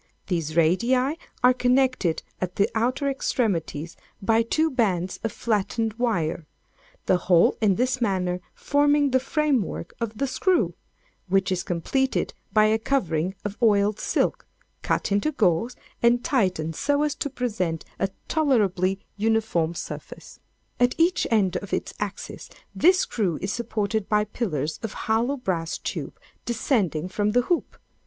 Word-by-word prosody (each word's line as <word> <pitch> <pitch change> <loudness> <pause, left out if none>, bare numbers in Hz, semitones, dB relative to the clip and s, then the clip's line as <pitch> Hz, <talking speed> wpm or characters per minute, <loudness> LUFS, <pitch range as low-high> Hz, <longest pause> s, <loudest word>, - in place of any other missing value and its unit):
These 165 -4 -2
radii 180 +10 +3 0.5
are 250 0 +7
connected 250 -9 +1 0.2
at 180 -1 -3
the 200 - +3
outer 255 +5 0
extremities 180 - -1 0.2
by 225 +3 +3
two 315 +8 +1
bands 190 -8 0
of 225 - -1
flattened 225 0 -1
wire—the 200 - -3
whole 175 -1 +4
in 205 -3 +4
this 255 +3 0
manner 180 -4 0
forming 290 0 +2
the 260 - +4
framework 265 - -1
of 225 -2 -3
the 275 - 0
screw, 265 - +1 0.6
which 190 0 +2
is 180 -1 0
completed 265 +10 -1 0.2
by 215 -1 +5
a 220 +1 +3
covering 190 - 0
of 205 0 -4
oiled 210 -2 +3
silk - - 0 0.3
cut - - -1
into 205 +10 +2
gores, 210 +1 +1 0.3
and 240 +1 +4
tightened 185 - 0
so 285 - +1
as 300 -1 0
to 290 - -3
present 205 - -2
a 195 - +1 0.2
tolerably 200 - +2 0.2
uniform 210 -6 +1
surface. - - -8 0.4
At 245 0 +3
each 345 +2 +2
end 195 -5 +2
of 195 +1 -7
its - - -2
axis 205 -1 -5 0.2
this 365 +2 +4
screw 185 -9 -1
is 190 +2 -2
supported 220 -3 -2
by 210 0 +3
pillars 165 - -3
of 225 -3 -4
hollow 230 +6 +1
brass 175 -9 -2
tube - - -5 0.2
descending 210 - 0
from 205 +3 -1
the 245 - +4
hoop. 345 +6 -1
215 Hz, 140 wpm, -25 LUFS, 185-250 Hz, 0.6 s, are